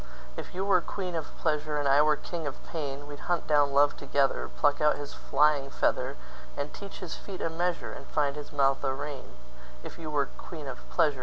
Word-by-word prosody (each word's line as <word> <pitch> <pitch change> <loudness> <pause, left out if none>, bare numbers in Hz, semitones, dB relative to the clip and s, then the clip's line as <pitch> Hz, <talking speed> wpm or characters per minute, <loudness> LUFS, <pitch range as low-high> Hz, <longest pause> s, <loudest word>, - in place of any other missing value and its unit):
If - - -7
you 190 +1 0
were 195 -3 +5
queen 185 0 -4
of 160 -2 -1
pleasure, 150 -1 0
And 145 -1 +1
I 140 +2 +6
were 150 0 +5
king 165 0 -5
of 135 - -6
pain, 145 -3 -4
We'd 145 0 -8
hunt 175 -2 +1
down 145 -2 +4
love 145 +1 +5
together, 140 -1 +1
Pluck 145 -1 +3
out 150 0 +4
his 145 -1 -6
flying 145 -1 +3
feather, - - +1 0.4
And 145 +1 -3
teach 200 0 -8
his 180 -4 -5
feet 195 -2 -7
a 165 - -1
measure, 175 +1 -1
And - - -9
find 145 -2 +1
his 150 -1 -7
mouth 135 -2 +3
a 135 -1 +1
rein; 140 -1 -6 0.5
If - - -9
you 160 -2 -5
were 145 -2 +2
queen 155 +3 -9
of 130 -2 -5
pleasure. 145 -4 +2
150 Hz, 215 wpm, -29 LUFS, 140-160 Hz, 0.5 s, I